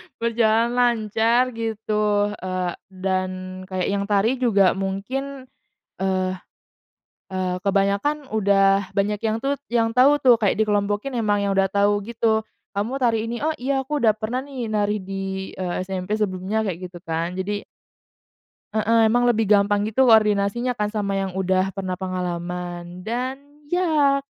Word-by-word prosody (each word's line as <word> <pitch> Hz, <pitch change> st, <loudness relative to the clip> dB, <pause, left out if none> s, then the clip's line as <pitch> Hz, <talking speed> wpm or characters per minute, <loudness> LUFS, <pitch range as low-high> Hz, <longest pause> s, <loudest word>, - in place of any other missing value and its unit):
berjalan 230 Hz, 0 st, +2 dB
lancar 235 Hz, +1 st, +2 dB
gitu, 210 Hz, -2 st, 0 dB
eee, 185 Hz, -2 st, -3 dB, 0.2 s
dan 185 Hz, 0 st, -1 dB, 0.4 s
kayak 185 Hz, -2 st, -2 dB
yang 200 Hz, 0 st, 0 dB
tari 215 Hz, +5 st, +2 dB
juga 200 Hz, -7 st, +4 dB
mungkin, 255 Hz, +9 st, -4 dB, 0.6 s
eee 185 Hz, -1 st, 0 dB, 0.9 s
eee, 185 Hz, -1 st, -2 dB
kebanyakan 200 Hz, +10 st, 0 dB
udah 195 Hz, -2 st, +3 dB
banyak 205 Hz, +1 st, +1 dB
yang 220 Hz, -1 st, 0 dB
tut 280 Hz, +1 st, 0 dB
yang 230 Hz, -1 st, +1 dB
tahu 260 Hz, +5 st, +5 dB
tuh 245 Hz, -3 st, +6 dB
kayak 205 Hz, -4 st, +2 dB
dikelompokin 205 Hz, +4 st, 0 dB
emang 205 Hz, -3 st, +1 dB
yang 200 Hz, -, 0 dB
udah 195 Hz, 0 st, +3 dB
tahu 205 Hz, +1 st, +2 dB
gitu, 225 Hz, -1 st, +1 dB, 0.3 s
“Kamu 210 Hz, +6 st, -2 dB
tari 225 Hz, -2 st, +1 dB
ini.” 235 Hz, +3 st, -4 dB
“Oh, 315 Hz, -, +2 dB
iya 270 Hz, +1 st, 0 dB
aku 295 Hz, +2 st, -2 dB
udah 220 Hz, -3 st, +3 dB
pernah 220 Hz, +4 st, -3 dB
nih 260 Hz, -4 st, -5 dB
nari 210 Hz, 0 st, +1 dB
di, 190 Hz, 0 st, -4 dB
eee, 185 Hz, 0 st, -3 dB
SMP 190 Hz, +2 st, -3 dB
sebelumnya,” 205 Hz, +1 st, -1 dB
kayak 185 Hz, -2 st, -4 dB
gitu 175 Hz, -1 st, -12 dB
kan 165 Hz, +2 st, -2 dB
jadi 205 Hz, +2 st, -3 dB, 1.1 s
Heeh, 220 Hz, +1 st, +3 dB
emang 245 Hz, +2 st, +3 dB
lebih 225 Hz, -3 st, +2 dB
gampang 205 Hz, 0 st, +4 dB
gitu 220 Hz, +5 st, +2 dB
koordinasinya 220 Hz, +2 st, +3 dB
kan 210 Hz, 0 st, -1 dB
sama 200 Hz, -2 st, -1 dB
yang 195 Hz, -1 st, -2 dB
udah 190 Hz, 0 st, 0 dB
pernah 185 Hz, -2 st, -4 dB
pengalaman 180 Hz, -1 st, -4 dB
dan 250 Hz, +6 st, -3 dB, 0.2 s
ya 300 Hz, -4 st, +2 dB
210 Hz, 145 wpm, -23 LUFS, 190-235 Hz, 1.1 s, tuh